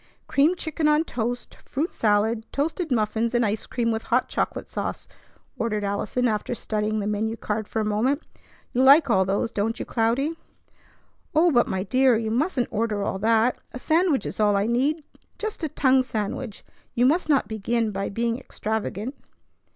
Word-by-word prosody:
"Creamed 310 +6 +3
chicken 315 -2 -1
on 300 +1 +4
toast, 245 -4 -4
fruit 300 +6 -3
salad, 220 +1 +1
toasted 320 +3 -2
muffins, 225 0 0
and 240 -1 +3
ice 210 +1 -2
cream 235 -2 0
with 225 0 -3
hot 250 +2 +1
chocolate - - -2
sauce," - - -4 0.5
ordered 215 -3 -1
Allison 205 +5 0
after 215 +2 -1
studying 215 -1 -1
the 200 - -2
menu 215 +2 -1
card 215 0 -3
for 220 - -2
a - - -1
moment. 235 +8 +1 0.5
"You 250 - +1
like 275 0 +7
all 190 -3 +4
those, 200 +4 0
don't 220 +3 -1
you, - - -3
Cloudy?" 240 +6 +1 1.0
"Oh, 335 +3 +5
but 240 -4 +3
my 190 0 -2
dear! 255 +2 +3
You 220 -1 -2
mustn't 255 +1 0
order 215 -2 -1
all 195 - -2
that. 225 +3 +2
A - - -5
sandwich 320 +1 +2
is - - -5
all 210 -1 +3
I 200 +1 +2
need. 275 +7 +1 0.3
Just 435 -5 -4
a 315 - 0
tongue 265 -1 +3
sandwich. 220 -1 -4 0.3
You 245 - +3
must 315 +5 +2
not 280 -3 +3
begin 220 +1 -1
by 195 0 -3
being 230 +3 -1
extravagant." 220 +2 -4
230 Hz, 175 wpm, -24 LUFS, 215-270 Hz, 1.0 s, like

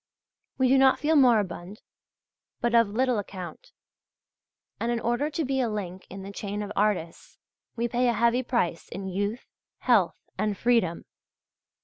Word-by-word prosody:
We 260 - +3
do 265 +1 +5
not 265 0 +5
feel 310 +1 +1
moribund, 210 - +2 0.8
but 240 0 0
of 230 -2 +5
little 245 +1 +1
account; 185 -4 -8 1.1
and 235 +1 -1
in 235 - 0
order 240 +6 0
to 310 0 -2
be 265 0 0
a 240 - 0
link 190 -3 -5
in 195 +1 -8
the 195 - -7
chain 205 +1 -4
of 205 - -6
artists 195 -5 -1 0.4
we 235 0 0
pay 245 +1 +1
a 240 - +3
heavy 235 +3 +2
price 235 -10 -1
in 190 0 -5
youth, 205 +5 -2 0.3
health, 220 -9 +3 0.2
and 210 -1 0
freedom. 230 -8 +1
225 Hz, 155 wpm, -27 LUFS, 195-245 Hz, 1.1 s, do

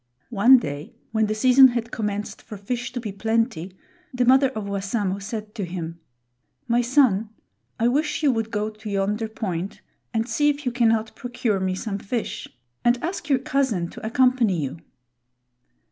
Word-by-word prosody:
One 240 +5 +7
day, 145 - -5 0.2
when 220 -1 +2
the 215 - -1
season 255 +4 +7
had 235 -1 -3
commenced 210 -1 -3
for 210 - -9
fish 240 +4 -4
to 250 - -3
be 220 -4 -5
plenty, 210 -4 -1 0.3
the 250 -2 +1
mother 265 +2 +5
of 220 -5 -5
Wassamo 200 0 -2
said 215 +1 -6
to 210 - -4
him: 170 -2 -5 0.7
"My 240 0 +3
son, 240 -5 +3 0.5
I 230 - +3
wish 295 +5 0
you 285 - +5
would 225 -2 -2
go 215 -1 -2
to 215 0 -9
yonder 205 +3 0
point 195 -4 -4 0.3
and 225 0 -1
see 295 +3 +2
if 290 0 -2
you 250 - +1
cannot 225 -2 +1
procure 240 -5 -1
me 185 0 -1
some 200 +1 -4
fish, 225 +4 -4 0.4
and 240 +1 +4
ask 335 -3 -4
your 275 - +4
cousin 250 -10 0
to - - -11
accompany 235 -4 +2
you." 140 +2 -4
225 Hz, 170 wpm, -24 LUFS, 200-245 Hz, 0.7 s, One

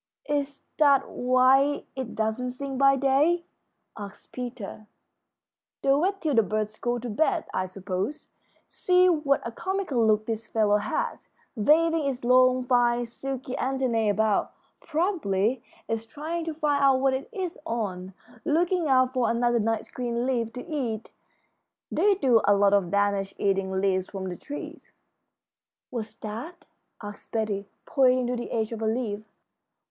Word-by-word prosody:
"Is 285 -1 -2
that 280 -3 +4
why 260 +3 +3
it 260 -4 -5
doesn't 220 +3 -1
sing 270 +2 -5
by 275 +1 +5
day?" 285 +6 +2 0.5
asked 205 -2 -10
Peter. 240 -4 -7 1.0
"They 275 - +4
wait 375 +8 +1
till 310 -4 0
the 230 - +5
birds 215 0 -3
go 240 0 -1
to 240 +1 -6
bed, 315 - +1
I 185 - -1
suppose. 190 +7 -4 0.4
See 365 0 +3
what 300 -5 +1
a 230 - -3
comical 350 -4 -1
look 215 -1 +3
this 225 -1 -4
fellow 210 -2 +2
has, 485 - -3 0.3
waving 315 +6 +3
its 260 -3 -3
long, 255 +1 +4
fine, 245 -1 +2
silky 260 +2 -6
antennæ 255 -5 0
about. 215 0 +1 0.3
Probably 265 - 0 0.2
it's 225 -1 -2
trying 315 +8 -4
to 325 - -3
find 290 -2 +1
out 270 -1 +5
what 265 0 +2
it 265 - -4
is 375 -6 -4
on, 190 - -4 0.3
looking 340 +2 +1
out 255 -1 +3
for 255 -2 +1
another 240 0 +2
nice 225 0 -1
green 240 -1 -2
leaf 235 -4 0
to 250 - -7
eat. 245 -9 -3 0.8
They 405 -1 +3
do 250 - +3
a 205 - +5
lot 200 0 +4
of 195 -4 +2
damage 200 0 0
eating 195 -1 0
leaves 190 -1 0
from 190 -2 -5
the 180 - -5
trees." 290 +10 -9 1.0
"What's 225 -3 -5
that?" 295 - -7 0.4
asked 205 0 -9
Betty, 210 -3 -1 0.2
pointing 255 -2 +3
to 250 +1 -1
the 240 - -5
edge 220 -1 -1
of 225 -1 -5
a 220 - 0
leaf. 220 -2 -2
245 Hz, 150 wpm, -26 LUFS, 215-280 Hz, 1.0 s, by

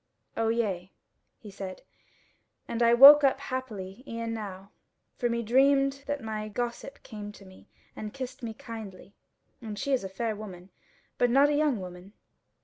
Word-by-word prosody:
"O 225 0 0
yea," 195 -6 -1 0.5
he 210 - -12
said, 190 -1 -8 0.8
"and 235 - -3
I 235 0 +5
woke 285 +4 +11
up 275 - +3
happily 230 -4 -6
e'en 230 0 -4
now; 200 -3 -7 0.4
for 240 - -1
me 235 0 -1
dreamed 275 +3 +3
that 285 -3 -3
my 215 -1 -4
gossip 240 +5 -5
came 210 -3 -8
to 200 - -15
me 190 0 -17 0.3
and 210 -1 -6
kissed 260 0 -7
me 225 -2 -5
kindly; 215 -4 -9 0.5
and 215 -3 -6
she 280 +6 -1
is 260 - +1
a 190 - -5
fair 220 +3 -3
woman, 190 -3 -10 0.5
but 245 - +4
not 275 +4 +5
a 295 - +1
young 290 -6 +2
woman." 180 +1 -10
225 Hz, 165 wpm, -28 LUFS, 200-255 Hz, 0.8 s, woke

